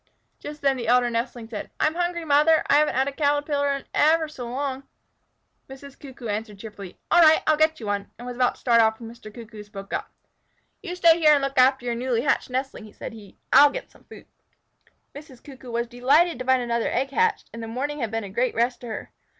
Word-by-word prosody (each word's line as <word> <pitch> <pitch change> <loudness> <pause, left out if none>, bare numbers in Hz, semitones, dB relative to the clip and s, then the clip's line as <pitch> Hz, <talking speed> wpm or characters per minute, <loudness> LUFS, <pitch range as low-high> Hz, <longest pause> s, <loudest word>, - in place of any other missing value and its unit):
Just 295 0 -9
then 275 -1 +2
the 235 -2 -5
elder 245 0 +3
nestling 230 0 -4
said, 220 -3 -7
"I'm 310 - +2
hungry, 345 -1 -2
Mother! 305 +2 +4
I 285 - +4
haven't 300 -3 +2
had 265 +2 +1
a - - -2
Caterpillar 290 0 0
in 275 -1 -4
ever 315 +1 +3
so 255 -6 -8
long." 265 +1 -3 0.9
Mrs. 270 +1 -12
Cuckoo 265 -3 -11
answered 210 0 -4
cheerfully, 200 -3 -10
"All 345 - +6
right, 315 -1 +6
I'll 310 - +4
get 315 +1 +1
you 225 - -8
one," 205 -1 -3
and 240 - -10
was 245 0 -6
about 250 0 +1
to - - -21
start 235 -2 +4
off 220 0 +1
when 230 -1 -9
Mr. 230 -2 -13
Cuckoo 220 -1 -11
spoke 200 -1 -10
up: - - -3 0.7
"You 360 -4 -6
stay 335 -2 +5
here 305 -2 +6
and 280 - -1
look 275 -1 -1
after 260 0 +4
your 240 - -1
newly 240 0 -1
hatched 280 - 0
nestling," 255 -4 -5
said - - -8
he. 210 -3 -14 0.2
"I'll 290 0 +8
get - - -8
some - - -23
food." - - -14 0.9
Mrs. 285 -4 -13
Cuckoo 265 -3 -12
was 235 0 -2
delighted 260 +6 +2
to 255 - -5
find 260 -1 +2
another 235 -1 -1
egg 270 +2 -1
hatched, 450 +7 0
and 230 - -7
the 225 - -6
morning 275 +6 -4
away - - -6
had 230 - -2
been 225 0 -3
a 200 - -7
great 245 +5 -1
rest 240 +2 0
to 245 - -8
her. 220 - -7
255 Hz, 230 wpm, -24 LUFS, 235-290 Hz, 0.9 s, I'll